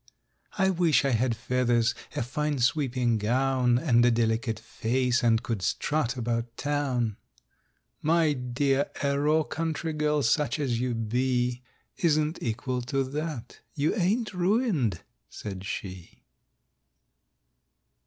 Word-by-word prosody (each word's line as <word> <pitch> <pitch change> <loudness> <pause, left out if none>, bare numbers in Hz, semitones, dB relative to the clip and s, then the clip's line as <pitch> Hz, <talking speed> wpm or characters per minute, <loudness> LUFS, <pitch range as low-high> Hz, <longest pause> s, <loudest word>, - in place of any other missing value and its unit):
—"I 190 -1 +3
wish 170 -5 +3
I 135 - +2
had 120 0 +1
feathers, 120 -1 +1 0.2
a - - 0
fine 150 +4 -2
sweeping 125 -3 +1
gown, 125 +2 +2
And 120 -5 +3
a 120 - +5
delicate 115 0 0
face, 125 +2 0
and 115 -2 +3
could 115 -6 -3
strut 130 +4 -1
about 115 0 -2
Town!"— 130 -7 -1 0.8
"My 160 -1 +3
dear—a 140 +2 0
raw 155 +2 +3
country 160 +1 -3
girl, 150 -1 +1
such 150 +2 +1
as 130 -6 -1
you 125 -1 -1
be, 125 +2 0 0.4
Isn't 155 -1 +1
equal 125 +2 -2
to 135 +3 -1
that. 150 -5 -5 0.2
You 150 +1 +1
ain't 215 +3 0
ruined," 180 - +1 0.3
said 95 -3 -7
she. 90 -4 -7
130 Hz, 120 wpm, -27 LUFS, 120-150 Hz, 0.8 s, a